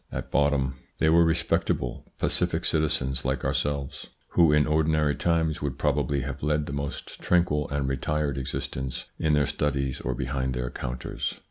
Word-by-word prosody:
At - - -5
bottom 70 -2 +2 0.2
they 80 - +3
were 85 +1 +6
respectable, 80 -1 0
pacific - - +1
citizens 70 -4 +1
like 65 +1 -1
ourselves, 70 -2 -1 0.2
who 85 -3 +5
in 75 -1 +4
ordinary 75 -1 +2
times 80 -2 +1
would 70 -3 -2
probably 70 -1 +1
have 70 +1 -5
led 75 0 +1
the 70 - -5
most 70 0 -5
tranquil 85 -4 +2
and 70 -1 -1
retired 70 +1 -1
existence 65 0 -4
in 80 -1 +2
their 75 -1 +4
studies 70 -2 -1
or - - -2
behind 65 0 -2
their 60 -1 -2
counters. 60 0 -4
70 Hz, 155 wpm, -27 LUFS, 65-75 Hz, 0.2 s, were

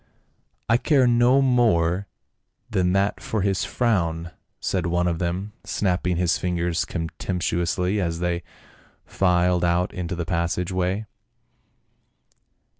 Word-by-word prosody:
" - - -45
I 115 +1 +4
care 135 0 +3
no 120 +3 +4
more 100 -8 +2 0.6
than 90 -1 +1
that 100 +1 +1
for 110 -3 -2
his 95 -2 +1
frown," 85 -8 0 0.3
said 90 -3 -1
one 85 +1 +1
of 85 -2 -1
them, 90 +4 -3
snapping 90 -2 0
his 90 -1 +1
fingers 85 -1 -1
contemptuously 90 +3 -1
as 85 -2 -1
they 85 0 -1 0.6
filed 90 -1 +2
out 85 +1 +1
into 90 -1 -4
the 85 -1 -3
passage 85 +2 -1
way. 95 +3 -1
90 Hz, 120 wpm, -24 LUFS, 85-100 Hz, 0.6 s, I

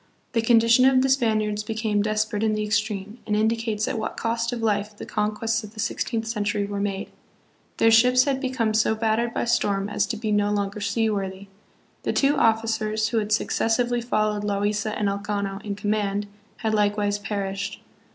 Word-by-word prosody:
The 230 - +1
condition 230 +1 +5
of 260 -1 +5
the 265 - +1
Spaniards 215 -5 +1
became 220 -1 -1
desperate 215 0 -1
in 220 -1 +2
the 215 - -1
extreme, 210 +1 -2
and 210 - +1
indicates 220 0 0
at 235 - -2
what 220 - -4
cost 230 +1 -1
of 235 -2 -4
life 210 -1 0
the - - -7
con 210 0 -1
quests 225 +1 -1
of 215 +1 -11
the - - -10
sixteenth 225 0 -2
century 205 -2 -1
were 200 0 -4
made. 200 -1 -3 0.7
Their 225 - +4
ships 250 +3 +6
had 270 -1 -1
become 255 -5 0
so 220 0 +2
battered 225 +1 0
by - - -2
storm 200 -4 +1
as 210 -1 0
to 220 - -3
be 215 0 -2
no 205 0 +2
longer 205 0 -2
sea 220 +2 +1
worthy. 195 -1 -4 0.5
The - - -1
two 280 +1 +3
officers, 220 -2 +1
who 230 - +1
had 210 0 -3
successively 240 +2 +1
followed 215 -3 0
Loaisa 205 +1 -1
and 210 - 0
Elcano 200 0 -3
in 205 -1 -4
command, 205 0 -1 0.3
had 220 -2 -1
likewise 205 -1 +1
perished. 200 -1 -4
215 Hz, 185 wpm, -24 LUFS, 205-225 Hz, 0.7 s, ships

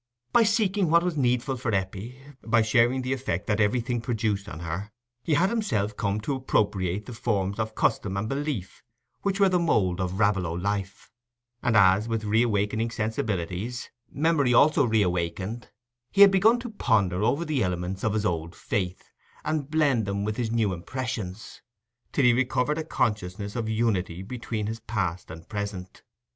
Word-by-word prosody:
By 240 - +6
seeking 210 -5 +2
what 170 +1 +5
was 180 -2 -1
needful 130 -1 +1
for 120 -1 -3
Eppie, 100 +6 -4 0.2
by 115 0 +3
sharing 120 +4 +3
the 130 +1 -1
effect 125 -9 -3
that 105 0 0
everything 120 +3 +1
produced 110 -4 -1
on 80 - -8
her, 85 +5 -5 0.3
he 155 - +1
had 190 +6 +3
himself 110 - -1
come 100 -1 -1
to 140 - -2
appropriate 105 -7 0
the 125 - -8
forms 100 -3 -1
of 110 0 -2
custom 100 -1 0
and 105 +2 -2
belief 135 -7 -4 0.4
which 195 0 -1
were 200 - +6
the 180 -1 +2
mould 95 - +1
of 90 0 -2
Raveloe 100 -5 +1
life; 100 +2 -3 0.5
and 115 -3 +2
as, 100 +2 +5
with 115 -1 -2
reawakening 110 0 +1
sensibilities, 110 0 -3 0.2
memory 145 -5 +2
also 155 +3 +5
reawakened, 100 +1 -1 0.4
he 200 - +3
had 200 -1 +10
begun 210 +5 +5
to 240 -2 -6
ponder 100 - +1
over 140 +10 +1
the 150 -5 0
elements 90 0 -2
of 110 - +1
his 110 0 0
old 85 -2 -2
faith, 105 -10 -3 0.3
and 150 -3 -1
blend 145 -8 +2
them 100 0 -1
with 105 +1 -2
his 120 -1 -2
new 110 -4 +1
impressions, 110 0 -5 0.5
till 140 - +2
he 120 - +6
recovered 130 +4 +1
a - - -2
consciousness 100 -5 -2
of 115 -2 -2
unity 100 -6 0
between 115 -1 -4
his 110 +2 -4
past 100 -6 -3
and 80 +1 -10
present. 100 -4 -5
110 Hz, 170 wpm, -26 LUFS, 100-130 Hz, 0.5 s, had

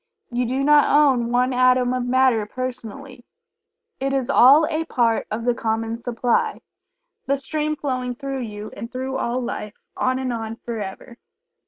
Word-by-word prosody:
You 245 0 -1
do 260 +3 -1
not 295 0 +5
own 265 -5 +3
one 250 +1 +2
atom 255 0 +3
of 250 -1 -2
matter 250 -4 +3
personally, 255 +1 -7 0.8
it 270 +1 -1
is 270 -1 0
all 280 +5 +7
a 315 0 -1
part 230 -5 +1
of 225 +2 -4
the 245 - +3
common 225 0 -2
supply, 240 0 -1 0.7
the 275 +1 +2
stream 305 +2 -2
flowing 255 -4 -3
through 275 0 -4
you 210 -2 -7
and 230 +4 -7
through 260 +1 -3
all 240 0 -1
Life, 215 -4 -5 0.2
on 255 0 0
and 260 -2 -2
on 225 -1 -4
forever. 230 +1 -7
250 Hz, 160 wpm, -22 LUFS, 235-265 Hz, 0.8 s, all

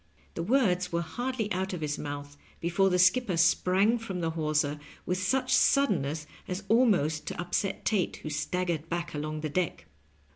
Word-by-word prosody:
The - - -4
words 180 -4 +2
were 170 0 0
hardly 245 +4 -3
out 190 +1 -1
of 175 - -4
his 150 -1 -2
mouth 145 0 -6 0.2
before 175 +3 +2
the 180 - +2
skipper 190 +1 +3
sprang 185 +6 +3
from 195 -5 -5
the 165 -1 -1
hawser 150 -2 0 0.3
with 180 +1 -1
such 255 +7 +1
suddenness 160 - +2 0.2
as 185 +2 -4
almost 195 - +3
to - - -5
upset 175 +2 -2
Tate, 200 -5 +1
who 155 - -4
staggered 170 0 -2
back 170 0 -3
along 155 +1 -4
the 155 - -2
deck. 175 +2 -2
180 Hz, 170 wpm, -29 LUFS, 155-200 Hz, 0.3 s, skipper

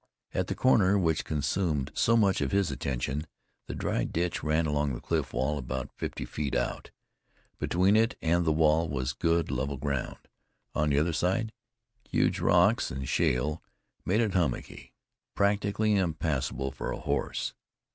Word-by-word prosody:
At - - 0
the - - -2
corner 100 -6 +4
which 80 -5 +1
consumed 75 -1 -1
so 115 0 +3
much 100 -7 +3
of 70 - 0
his 100 -6 +2
attention, 70 +3 -3 0.4
the - - -5
dry - - -1
ditch 85 +1 -2
ran 80 +2 +1
along 75 -2 0
the - - -6
cliff - - -1
wall 70 +4 -1
about 65 0 -4
fifty - - -4
feet 75 -2 -3
out; - - -2 0.7
between 95 +4 +3
it 115 +4 +2
and 85 +1 +2
the 80 - +2
wall 80 +1 +3
was 65 -1 -2
good 85 +3 +1
level 70 +2 -2
ground, 70 -1 -3 0.6
on 75 0 +1
the 70 - +2
other 80 +3 +2
side 95 +7 0 0.6
huge - - +1
rocks 95 +8 +3
and 65 +1 -5
shale 75 +6 +1 0.4
made 105 +5 +2
it 110 -5 0
hummocky, 85 -9 -2 0.4
practically 105 +1 +2
impassable 75 -7 -1
for - - -5
a - - -3
horse. 70 -2 -2
80 Hz, 155 wpm, -29 LUFS, 70-95 Hz, 0.7 s, corner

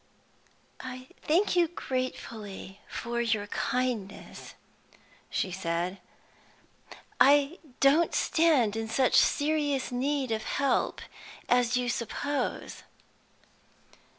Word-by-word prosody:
"I 255 0 -7 0.2
thank 360 +6 +2
you 345 -1 +4
gratefully 230 - -5
for 235 0 -3
your 220 -3 0
kindness," 220 -1 -3 0.7
she 190 - -1
said. 175 +1 -2 1.2
"I 285 +4 +5 0.2
don't 295 +5 +4
stand 290 -10 +3
in 225 0 -3
such 260 +2 +2
serious 290 -3 +2
need 265 0 -1
of 220 -1 0
help 275 +4 0 0.5
as 245 0 +3
you 250 0 -1
suppose." 245 +3 -3
250 Hz, 90 wpm, -29 LUFS, 220-285 Hz, 1.2 s, I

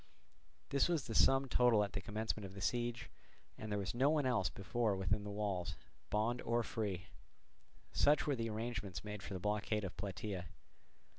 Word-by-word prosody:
This 140 +4 +3
was 165 -6 +1
the 115 - -4
sum 135 +4 +5
total 120 -4 +5
at 100 -2 -4
the 100 - -2
commencement 110 +1 -2
of 95 0 -7
the - - -7
siege, 120 +3 -1 0.4
and 110 -1 -6
there 105 - +1
was 100 -2 -2
no 130 +4 +4
one 150 -2 +2
else 115 -8 +2
within 100 -1 0
the 105 - -5
walls, 100 -4 -2 0.3
bond 115 +4 +1
or 120 +1 +1
free. 100 -6 -2 0.9
Such 145 +1 +4
were 145 - +1
the 115 -2 -2
arrangements 105 -6 -3
made 105 -1 -5
for 95 - -5
the - - -3
blockade 105 +2 0
of 95 - -4
Plataea. 95 0 -4
105 Hz, 175 wpm, -37 LUFS, 100-120 Hz, 0.9 s, sum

